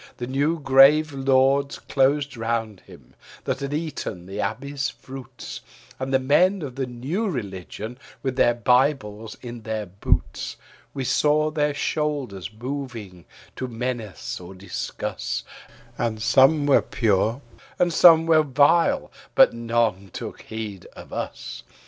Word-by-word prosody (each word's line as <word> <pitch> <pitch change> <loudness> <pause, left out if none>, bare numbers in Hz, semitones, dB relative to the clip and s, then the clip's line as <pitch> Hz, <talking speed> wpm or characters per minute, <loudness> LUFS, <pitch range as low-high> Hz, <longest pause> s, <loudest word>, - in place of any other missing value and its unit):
The 120 - -4
new 145 +6 0
grave 145 +2 +6
lords 135 +1 +2
closed 140 +1 +1
round 115 -3 -2
him, - - -16 0.3
that - - -2
had 140 0 -4
eaten 145 - -4
the 100 +3 -4
abbey's 135 +7 -2
fruits, 130 -1 -9 0.4
And 130 0 -3
the 135 - +5
men 175 +8 +3
of 135 -3 -5
the 135 0 -3
new 145 - -2
religion, 110 - -6 0.2
with 130 -2 -1
their 120 -2 +4
bibles 120 -3 +1
in 120 -1 -7
their 110 -1 -3
boots, 95 +2 -1 0.4
We 135 - -2
saw 155 +4 +2
their 150 -1 0
shoulders 145 - -2
moving, 115 -6 -6 0.3
to 130 - -4
menace 120 -3 -4
or 90 +2 -10
discuss, 95 +2 -4 0.6
And 110 -2 -1
some 135 +6 +4
were 145 - +5
pure 110 +3 +1 0.4
and 175 -1 +2
some 165 -1 +7
were 160 -1 +5
vile, 145 +4 +3 0.2
but - - +7
none 115 -4 0
took - - -7
heed 110 -4 -7
of - - -11
us. - - -5
130 Hz, 135 wpm, -24 LUFS, 110-145 Hz, 0.6 s, some